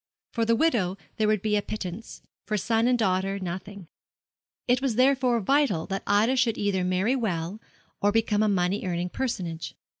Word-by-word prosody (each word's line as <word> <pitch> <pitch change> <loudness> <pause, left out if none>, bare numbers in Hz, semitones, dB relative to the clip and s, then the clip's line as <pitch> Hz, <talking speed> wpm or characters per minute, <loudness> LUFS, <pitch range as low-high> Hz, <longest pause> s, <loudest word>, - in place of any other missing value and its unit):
For 230 -1 0
the 230 +1 +3
widow 225 - +1 0.2
there 215 - +2
would 215 -2 +1
be 215 -1 +1
a 205 - +2
pittance, 205 +1 -7 0.2
for 215 - 0
son 225 +4 +1
and 250 0 +3
daughter 195 -2 0
nothing. 185 0 -6 0.8
It 250 +1 +3
was 265 -5 0
therefore 255 -1 +3
vital 270 - +2
that 195 0 -3
Ida 215 +6 +3
should 235 -3 +2
either 200 -3 0
marry 185 +7 +1
well 190 -5 -2 0.4
or 205 - +3
become 215 -1 +1
a 215 - +3
money 185 0 0
earning 180 -1 -2
personage. 180 -10 -4
210 Hz, 175 wpm, -26 LUFS, 185-235 Hz, 0.8 s, the